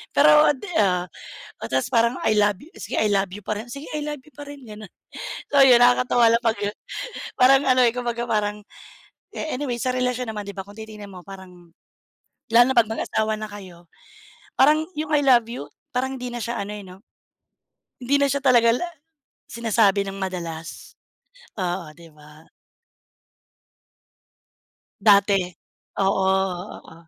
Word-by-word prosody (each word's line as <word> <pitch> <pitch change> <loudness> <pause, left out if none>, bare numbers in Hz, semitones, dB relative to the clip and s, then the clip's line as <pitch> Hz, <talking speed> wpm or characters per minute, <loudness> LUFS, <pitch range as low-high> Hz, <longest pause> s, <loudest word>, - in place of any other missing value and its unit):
pero 300 +1 +6
at 290 - -5
the - - -9
ah, 180 -3 +1 0.5
o - - -7
ta's 130 - 0
parang 235 +1 +3
I 220 - +3
love 205 -1 +3
you, 320 +5 -16
sige - - -5
I 215 - +2
love 195 -1 +1
you 205 +1 -9
pa 215 - -2
rin, 235 - -10
sige 280 +5 -8
I - - -2
love 295 -2 -5
you 300 - -20
pa 290 - -10
rin, 285 -2 -11
gano'n. 215 -2 -10 0.6
So 280 -1 +5
'yon 245 -2 +6
nakakatawa 245 -1 +4
lang 235 - +1
'pag, 225 -2 +1
ah, 205 - -3 0.6
parang 270 +2 +6
ano 255 -1 +4
eh 240 - +5
kumbaga 240 -1 -3
parang, 210 -1 0 0.8
eh, 315 - -3
anyway 250 -3 -3
sa 255 - 0
relasyon 250 -2 -1
naman 210 -1 -5
'di 200 - -7
ba 195 - -5
kung 205 - -13
titingin 210 -2 -10
mo 180 -1 -11
parang, 180 -3 -13 0.8
lalo 235 +1 +8
na 265 - -11
pag 230 -2 +5
mag-asawa 220 -1 -1
na 215 - -5
kayo 180 -4 -12 0.7
parang 305 +3 +4
'yung 305 0 -3
I 290 - +3
love 245 -4 +5
you, 145 -12 -7 0.3
parang 265 +1 -1
hindi 250 - -5
na 240 - -5
siya 235 +1 -3
ano 200 +1 -5
eh 205 - -9
'no, 185 +1 -13 1.0
hindi 260 +3 +1
na 280 - +3
siya 280 +1 -1
talaga 240 -3 +5
la 300 - -2 0.7
sinasabi 220 -4 +2
nang 195 0 -6
madalas. 170 -4 -6 0.7
Oo, 175 -3 -3
'di 170 +1 -16
ba. 150 +1 -18 2.5
Dati, 200 -1 +5 0.6
oo, 195 0 +2 0.6
oo. - - -16
220 Hz, 170 wpm, -23 LUFS, 195-250 Hz, 2.5 s, lalo